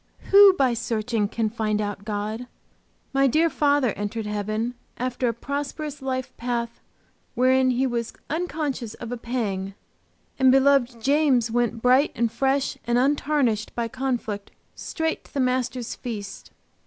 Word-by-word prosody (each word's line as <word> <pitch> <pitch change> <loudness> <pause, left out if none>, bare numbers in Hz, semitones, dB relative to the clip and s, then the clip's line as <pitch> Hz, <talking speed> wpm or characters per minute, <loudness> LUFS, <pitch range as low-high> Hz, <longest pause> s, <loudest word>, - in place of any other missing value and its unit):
Who 400 0 +9
by 265 -8 +2
searching 225 -2 -1
can 220 0 -1
find 215 -2 -1
out 205 -1 -4
God? 215 +3 -3 0.7
My 275 0 +4
dear 320 +5 +3
father 285 -3 +2
entered 205 +2 -4
heaven 215 +3 -2 0.2
after 250 0 -1
a - - +2
prosperous 285 +4 -5
life 260 -1 -3
path 235 -1 -3 0.6
wherein 255 +1 +4
he 255 +1 +1
was 235 -2 -2 0.2
unconscious 300 -8 -3
of 235 0 -8
a - - -1
pang, 205 -5 -3 0.6
and 260 -1 +6
beloved 265 -3 +3
James 275 -5 +3
went 235 -1 0
bright 255 +4 +4
and 230 -1 0
fresh 270 +3 0
and 240 0 +2
untarnished 270 -4 +1
by 235 -1 -1
conflict 240 -6 -3 0.2
straight 320 -1 -3
to - - -20
the - - 0
Master's 255 -1 -1
feast. 215 -5 -7
245 Hz, 140 wpm, -24 LUFS, 225-270 Hz, 0.7 s, Who